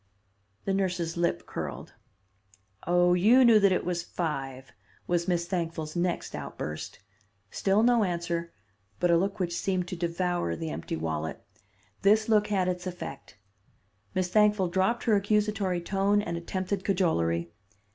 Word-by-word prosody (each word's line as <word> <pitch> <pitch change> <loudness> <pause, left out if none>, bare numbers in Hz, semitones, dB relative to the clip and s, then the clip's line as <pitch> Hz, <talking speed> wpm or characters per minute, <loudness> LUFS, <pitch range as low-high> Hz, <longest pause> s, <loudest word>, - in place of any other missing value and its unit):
The 195 - 0
nurse's 180 -4 -1
lip 170 0 0
curled. - - -6 0.9
'Oh, 175 0 +4
you 225 +9 +6
knew 225 -2 +7
that 200 -1 +4
it 185 - 0
was 175 -1 -1
five,' 135 -7 -4 0.3
was 175 0 0
Miss 175 -2 +1
Thankful's 165 -3 -3
next 175 0 -1
outburst. 75 0 -6 0.5
Still 200 +3 +2
no 240 -2 +4
answer, 170 -2 -2 0.5
but 175 - +3
a - - +6
look 195 +4 0
which 175 -2 -1
seemed 185 -1 -1
to - - -4
devour 170 - -1
the 80 -1 -4
empty 80 +3 -4
wallet. 80 -1 -4 0.6
This 215 +2 +4
look 215 -2 +3
had 190 -3 +1
its 180 0 -2
effect. 175 -6 -8 0.8
Miss 185 -1 0
Thankful 210 -2 +3
dropped 190 +7 +1
her 225 -3 +3
accusatory 205 -2 +1
tone, 195 +3 +1
and 170 -4 -3
attempted 185 +3 -3
cajolery. 85 - 0
180 Hz, 145 wpm, -28 LUFS, 170-195 Hz, 0.9 s, knew